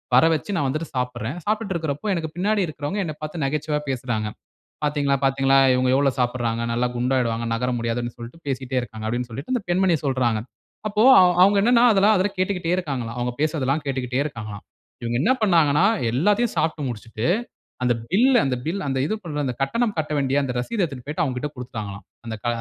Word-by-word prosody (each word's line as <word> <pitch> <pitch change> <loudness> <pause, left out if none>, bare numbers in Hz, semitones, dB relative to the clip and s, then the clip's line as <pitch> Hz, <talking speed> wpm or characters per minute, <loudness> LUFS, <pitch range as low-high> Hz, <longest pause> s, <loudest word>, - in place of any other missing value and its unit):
வர 130 - +7
வச்சு 200 +6 -4
நான் 145 - +1
வந்துட்டு 155 +5 -2
சாப்புட்றேன். 125 +3 -3
சாப்டுட்டு 215 -1 -1
இருக்கறபோ 160 +4 -2
எனக்கு 165 -3 -2
பின்னாடி 205 +4 +1
இருக்குறவங்க, 155 +6 -4
என்னப் 155 -2 -6
பாத்து 155 +2 -5
நகைச்சுவையா 150 +1 -1
பேசுறாங்க. 120 -4 -2 0.6
"பாத்தீங்களா 145 -2 +1
பாத்தீங்களா, 135 0 +3 0.2
இவங்க 125 0 +2
எவ்ளோ 140 -1 +3
சாப்டுறாங்க. 120 -2 0
நல்லா 125 +1 +1
குண்டாகிடுவாங்க, 120 -2 0
நகர 125 +2 -1
முடியாது", 115 +1 -1
ன்னு 120 -1 -5
சொல்லிட்டு 120 +8 -10
பேசிக்கிட்டே 130 -1 -2
இருக்காங்க. 110 -2 -8
அப்டின்னு 120 +1 -2
சொல்லிட்டு 140 - -4
அந்த 245 - -1
பெண்மணிய 180 -1 +3
சொல்றாங்க. 125 -5 +1 0.5
அப்போ 210 +1 +2 0.4
அவுங்க 200 +2 +6
என்னன்னா 240 +1 +5
அதெல்லா 200 +2 +5
அதுல 185 +2 +1
கேட்டுக்கிட்டே 185 -2 0
இருக்காங்களா, 135 -10 -3
அவங்க 125 0 -1
பேசுறதெல்லாம் 150 -2 0
கேட்டுக்கிட்டே 130 -2 -2
இருக்காங்களாம். 110 -8 -6 0.4
இவங்க 120 0 -2
என்ன 230 - +3
பண்ணாங்கன்னா 165 -5 +4 0.3
எல்லாத்தையும் 205 - +2
சாப்டு 160 -1 0
முடிச்சுட்டு, 115 0 -5 0.6
அந்த 125 -1 +3 0.2
பில் 245 +6 +5
அந்த 130 -2 0
பில் 190 +5 -2
அந்த 135 -1 0
இது, 215 - -1 0.3
அந்த 125 - -1
கட்டணம் 215 - 0
கட்ட 155 -1 -3
வேண்டிய 140 0 +1
அந்த 125 - -2
ரசீத 215 - -3
எடுத்துட்டு 135 -7 -5
போயிட்டு 150 +3 -1
அவங்ககிட்ட 130 +2 -3
குடுத்துட்டாங்களாம். 110 -5 -7 0.2
அந்த 115 -1 -4
க - - -2
140 Hz, 180 wpm, -23 LUFS, 125-170 Hz, 0.6 s, வர